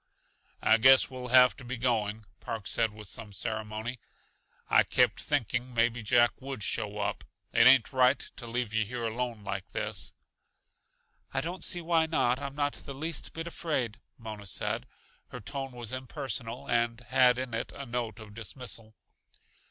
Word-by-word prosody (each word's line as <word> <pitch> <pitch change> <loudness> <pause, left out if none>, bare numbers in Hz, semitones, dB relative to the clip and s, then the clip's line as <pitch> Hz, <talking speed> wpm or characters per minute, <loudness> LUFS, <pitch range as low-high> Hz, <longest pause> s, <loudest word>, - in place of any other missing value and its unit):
"I 110 - +6
guess 130 +3 +7
we'll 125 -1 -6
have 125 0 +7
to - - -10
be 125 +1 -4
going," 110 -3 0
Park 110 -3 -5
said 115 +2 +1
with 105 -1 -9
some 110 +1 -5
ceremony. 110 +4 -3 0.7
"I - - +6
kept - - +2
think 145 -8 0
ing 125 0 -2
maybe 115 +1 +2
Jack 120 +2 +4
would 135 -5 -5
show - - -1
up; - - -2 0.3
it 115 +1 +7
ain't 130 0 +6
right 130 +1 +5 0.2
to 120 - -7
leave 115 -2 -2
yuh 110 0 +2
here 120 +3 -5
alone 115 -1 -3
like 100 -2 -5
this." - - -1 1.2
"I - - +2
don't 175 +3 -5
see 175 - +2
why 165 -1 +2
not; 130 -6 +2
I'm 140 -1 -5
not 145 -1 0
the 140 - -8
least 160 +2 -2
bit 165 0 -5
afraid," 145 -9 -2 0.2
Mona 110 -3 -8
said. - - -2 0.4
Her 125 - -8
tone 135 +4 -4
was 120 -1 -6
impersonal 130 -2 -4
and 115 0 +1
had 125 +1 +4
in 130 -2 -4
it 115 - -3
a 140 - -7
note 120 -3 -3
of 110 -2 -11
dismissal. 110 +1 -4
120 Hz, 170 wpm, -30 LUFS, 110-130 Hz, 1.2 s, guess